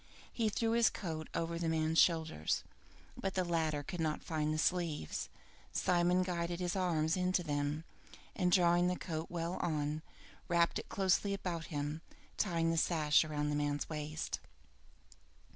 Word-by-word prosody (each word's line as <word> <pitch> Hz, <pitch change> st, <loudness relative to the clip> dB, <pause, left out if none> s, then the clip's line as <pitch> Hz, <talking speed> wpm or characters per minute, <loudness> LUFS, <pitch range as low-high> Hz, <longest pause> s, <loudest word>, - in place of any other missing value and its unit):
He 225 Hz, -2 st, +1 dB
threw 225 Hz, +2 st, 0 dB
his 230 Hz, -1 st, +5 dB
coat 160 Hz, -4 st, -5 dB
over 165 Hz, 0 st, -1 dB
the 165 Hz, -1 st, 0 dB
man's 160 Hz, 0 st, +2 dB
shoulders, 160 Hz, -, +2 dB, 0.5 s
but 195 Hz, -1 st, -3 dB
the 185 Hz, -, +2 dB
latter 160 Hz, -4 st, 0 dB
could 175 Hz, +5 st, -6 dB
not 155 Hz, -2 st, -1 dB
find 155 Hz, -2 st, -1 dB
the 155 Hz, -, 0 dB
sleeves. 155 Hz, -, -1 dB, 0.4 s
Simon 180 Hz, +1 st, +3 dB
guided 175 Hz, -1 st, -2 dB
his 180 Hz, 0 st, -1 dB
arms 165 Hz, -4 st, +1 dB
into 180 Hz, -1 st, +1 dB
them, 145 Hz, 0 st, -1 dB, 0.5 s
and 180 Hz, -2 st, +2 dB
drawing 175 Hz, -1 st, +5 dB
the 180 Hz, -, +1 dB
coat 160 Hz, -2 st, -4 dB
well 170 Hz, +1 st, -2 dB
on, 150 Hz, -1 st, -1 dB, 0.5 s
wrapped 170 Hz, -1 st, +2 dB
it -, -, -9 dB
closely 200 Hz, -1 st, +2 dB
about 175 Hz, -4 st, -3 dB
him, 150 Hz, +1 st, -3 dB, 0.3 s
tying 165 Hz, -4 st, +1 dB
the 165 Hz, -, 0 dB
sash 155 Hz, -2 st, +4 dB
round 150 Hz, -1 st, -1 dB
the -, -, 0 dB
man's 145 Hz, 0 st, -1 dB
waist. 155 Hz, 0 st, -3 dB
165 Hz, 155 wpm, -35 LUFS, 155-180 Hz, 0.5 s, his